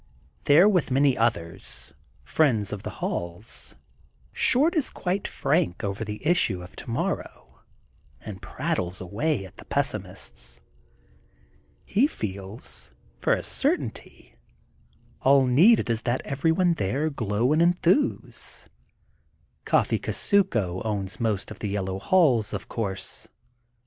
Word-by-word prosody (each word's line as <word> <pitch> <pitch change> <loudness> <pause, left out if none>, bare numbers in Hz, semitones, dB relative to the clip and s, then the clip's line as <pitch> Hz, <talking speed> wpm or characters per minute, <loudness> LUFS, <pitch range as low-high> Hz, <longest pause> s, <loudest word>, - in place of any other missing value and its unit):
There 160 +7 +7
with 185 -9 +2
many 135 0 +3
others, 110 -9 -2 0.3
friends 115 -11 +1
of 100 - -5
the - - -5 0.2
halls, 85 +8 -5 0.6
Short 295 +7 +3
is 305 -5 +1
quite 190 +2 -2
frank 85 - 0
over 100 +2 -2
the 105 +4 -7
issue 135 - +2
of 90 - -13
tomorrow 115 - -4 0.6
and 95 -4 -9
prattles 90 +1 -3
away 105 - -1
at 95 - -14
the - - -12
pessimists. - - -3 1.3
He 240 +8 +3
feels, 100 - -6 0.3
for - - +2
a - - -1
certainty, - - -2 0.9
all 135 0 +5
needed 165 - +5
is 115 -1 0
that 120 +2 -1
everyone 165 +5 +2
there 145 - -1
glow 115 +1 +1
and 155 - +3
enthuse. 175 - +1 1.0
Coffee - - +2
Kusuko 115 - +1
owns 100 -3 -3
most 110 -5 -1
of - - -9
the 105 - -3
Yellow 95 -1 -2
Halls, 125 - +3
of - - -5
course. 100 -4 -5
115 Hz, 120 wpm, -26 LUFS, 100-160 Hz, 1.3 s, There